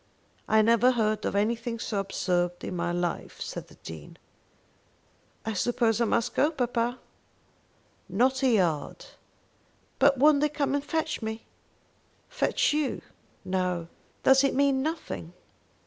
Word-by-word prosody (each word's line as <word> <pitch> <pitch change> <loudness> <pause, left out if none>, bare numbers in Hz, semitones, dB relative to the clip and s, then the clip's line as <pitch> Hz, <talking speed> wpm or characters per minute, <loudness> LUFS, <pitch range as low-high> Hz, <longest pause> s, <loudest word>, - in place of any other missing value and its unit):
"I 220 0 +4
never 235 +3 +4
heard 215 -2 0
of - - -2
anything 230 +3 0
so 215 -2 -3
absurd 180 -2 -1
in - - -4
my 175 0 -1
life," 175 0 -3
said - - -6
the - - -17
Dean. 80 -2 -10 1.3
"I 225 - -2
suppose 230 +2 +1
I - - +4
must 235 +2 0
go, 295 - +3
papa?" 245 -4 -1 1.1
"Not 255 +8 +2
a 265 - +3
yard." 175 -10 0 0.9
"But 275 0 +5
won't 290 +2 +5
they 300 - +3
come 290 -2 -1
and 285 0 0
fetch 315 0 -2
me?" 220 0 -5 0.8
"Fetch - - +1
you? 300 -2 -1 0.4
No." 180 -2 -1 0.3
"Does 265 +1 +6
it 275 - +1
mean 275 -1 +3
nothing." 305 - -4
230 Hz, 135 wpm, -27 LUFS, 190-275 Hz, 1.3 s, Does